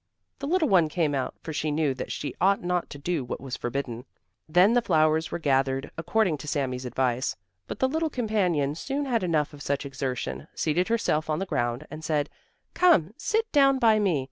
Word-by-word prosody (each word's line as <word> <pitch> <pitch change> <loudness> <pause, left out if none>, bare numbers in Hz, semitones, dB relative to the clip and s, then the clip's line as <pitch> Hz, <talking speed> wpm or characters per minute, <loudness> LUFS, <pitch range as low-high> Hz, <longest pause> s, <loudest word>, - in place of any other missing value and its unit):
The 280 - -4
little 340 0 +2
one 175 - +4
came 155 -2 0
out, 135 -2 -2
for 160 - -5
she 155 +1 -1
knew 150 -2 +1
that 130 - -6
she 145 - -4
ought 195 0 +3
not 180 0 -1
to - - -8
do 155 0 -2
what 120 - -5
was 130 -1 -5
forbidden. 120 -1 -4 0.4
Then 180 +7 +5
the 245 - +4
flowers 160 -5 +2
were - - -3
gathered 135 -3 0
according 175 -2 +1
to 150 - -9
Sami's 130 -4 -2
advice, 125 0 0 0.3
but - - -5
the 260 - +2
little 320 +4 -1
companion 190 - 0
soon 275 - -3
had 240 -4 +1
enough 160 -5 0
of 145 - -11
such 140 0 -2
exertion, 130 - -4
seated 165 +3 +1
herself 155 -9 0
on 155 - +1
the 190 - -2
ground 120 -4 -2
and 155 +1 -8
said: 150 -2 0 0.4
"Come, 215 - +4
sit 445 +1 -1
down 275 -2 +5
by 225 -4 +4
me. 185 -8 +2
155 Hz, 200 wpm, -26 LUFS, 140-210 Hz, 0.4 s, Then